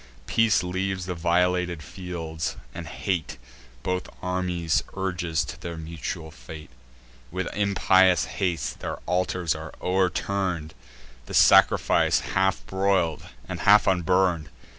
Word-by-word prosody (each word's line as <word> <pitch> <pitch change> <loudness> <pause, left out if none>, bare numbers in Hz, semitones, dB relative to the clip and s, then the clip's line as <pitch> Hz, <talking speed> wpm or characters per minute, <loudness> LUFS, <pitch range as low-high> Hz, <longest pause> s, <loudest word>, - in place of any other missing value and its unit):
Peace 115 - +3
leaves 95 +1 -2
the 90 - -3
violated 90 0 +1
fields, 80 -3 -5 0.2
and 85 -2 -7
hate 85 +1 -3 0.5
Both 90 0 -2
armies 90 -3 0
urges 90 -4 -1
to - - -9
their 85 -1 -6
mutual 80 0 -6
fate. 75 +4 -11 0.6
With 95 +3 -3
impious 95 -3 +4
haste 90 -4 -2
their - - -4
altars 90 -2 0
are - - -7
o'erturn'd, 90 -3 -1 0.5
The - - -5
sacrifice - - +5
half 95 0 +1
broil'd, 95 -4 0 0.2
and - - -5
half 105 +1 +6
unburn'd. 90 -3 +2
90 Hz, 115 wpm, -25 LUFS, 85-95 Hz, 0.6 s, half